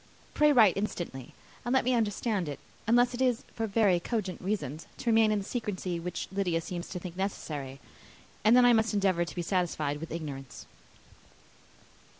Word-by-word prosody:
Pray 300 0 +5
write 220 -9 +6
instantly, 175 - -4 0.3
and 240 - -1
let 260 - +3
me 255 - +3
understand 210 -5 0
it 145 - -5 0.3
unless 245 +2 +4
it 245 - -4
is, 250 -3 +2
for 225 -1 -2
very 200 -4 +3
cogent 190 -2 -3
reasons, 180 -6 -3
to 235 - 0
remain 220 -1 +5
in 210 - +2
the 200 - -4
secrecy 190 -7 -3
which 175 +1 -4
Lydia 190 -4 0
seems 175 +1 -6
to - - -5
think 180 -1 -7
necessary; 150 -8 -4 0.6
and 225 +3 +6
then 250 - +7
I 245 - +7
must 220 -1 +2
endeavour 190 -4 +2
to - - -9
be 175 - -2
satisfied 165 -5 -1
with 165 - -7
ignorance." 145 -5 -6
195 Hz, 175 wpm, -29 LUFS, 170-225 Hz, 0.6 s, then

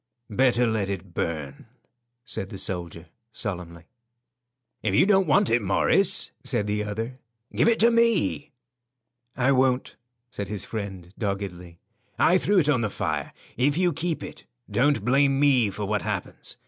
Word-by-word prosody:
"Better 125 +2 +3
let 110 -4 -1
it 95 -2 -6
burn," 75 -5 -4 0.6
said 95 - -3
the 100 - -7
soldier, 85 -3 -5 0.3
solemnly. 85 -7 -5 1.0
"If 100 -3 0
you - - +5
don't 195 -3 +3
want 140 -5 +3
it, 115 +1 +3
Morris," 100 -2 +2
said 105 - 0
the 105 0 -1
other, 115 +5 -5 0.4
"give - - +3
it 230 -1 +3
to 235 +1 +6
me." 230 -10 +2 0.9
"I 130 +2 +3
won't," 130 -1 +1 0.3
said 100 -4 -5
his 105 0 -4
friend, 95 -5 -6
doggedly. 95 -5 -4 0.4
"I 185 +2 +4
threw 205 +2 +1
it 160 -5 +4
on 135 -5 +2
the 110 - 0
fire. - - -3 0.3
If 140 +5 +2
you 180 -2 +2
keep 165 +2 -3
it, - - -10 0.3
don't 140 -4 +2
blame 135 +2 +3
me 130 -7 +4
for 100 +2 -5
what 105 0 -1
happens. - - -5
110 Hz, 155 wpm, -25 LUFS, 95-140 Hz, 1.0 s, to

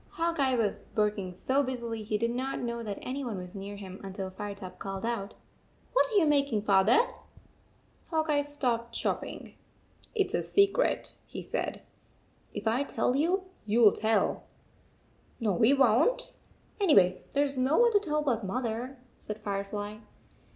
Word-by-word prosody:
Hawk 335 -1 -1
Eye 265 -2 +3
was 220 -4 -1
working 210 -4 0
so 265 +8 +1
busily 235 -4 -3
he 215 0 -1
did 230 +2 0
not 260 +3 -2
know 235 -1 -3
that 210 -3 -4
any 270 +2 -3
one 230 -6 -3
was 180 0 -7
near 200 0 -6
him 190 -2 -9
until 190 -1 -5
Firetop 195 -1 -7
called 195 +1 -4
out, 225 -4 -3 0.3
" - - -35
What - - +3
are - - -2
you 360 - +5
making, 280 -8 +2
Father? 200 - +5 0.6
" - - -35
Hawk 315 -1 0
Eye 290 -2 +3
stopped 245 -5 -1
chopping. - - -3 0.3
" - - -25
It 400 -3 +2
s - - -10
a - - +1
secret," 400 +5 +2
he - - -7
said. - - -3 0.3
" - - -36 0.4
If - - -3
I 230 +4 +2
tell 255 - 0
you, 350 +7 +2 0.2
you 220 +3 +3
11 210 - +6
tell." 220 +1 +1 0.5
" - - -35
No, 215 -4 +1
we 220 +8 +4
won 275 - +4
t. - - -4 0.5
Anyway, 195 - +4
there 285 - +3
s 280 -1 -1
no 260 +4 +2
one 475 0 +6
to 415 - +5
tell 300 -6 -1
but 240 -6 0
Mother," 240 +5 -3 0.2
said 210 - -6
Firefly. 205 0 -4
235 Hz, 180 wpm, -29 LUFS, 205-285 Hz, 0.6 s, 11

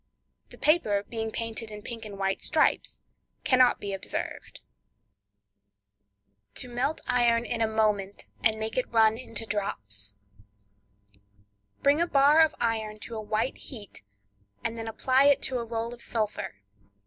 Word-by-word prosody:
The - - -12
paper 215 -11 +3
being 225 0 -4
painted 225 -1 -4
in 210 -1 -9
pink 230 -2 -6
and 205 -2 -8
white 195 0 -1
stripes, 310 0 +1 0.4
cannot 255 -1 +5
be 200 -1 -4
observed. 195 - -5 1.9
To - - -3
Melt 250 +6 -1
Iron 240 -2 +3
in 235 -1 -2
a 225 - +3
Moment, 210 -3 0 0.2
and 220 -1 +3
Make 220 +2 -3
It 255 - -2
Run 220 -1 +5
into 230 -2 -5
Drops.—Bring 100 - -5
a 340 - +2
bar 290 +1 +6
of 315 -1 +4
iron 220 -2 -1
to 235 - -7
a 220 - -3
white 215 +4 -1
heat, 215 -6 -9 0.6
and 225 - -1
then 225 -1 -5
apply 260 +4 +3
it 285 -1 +6
to 255 -2 0
a - - -2
roll 230 +1 -3
of 240 - -12
sulphur. 215 - -2
220 Hz, 145 wpm, -28 LUFS, 195-240 Hz, 1.9 s, bar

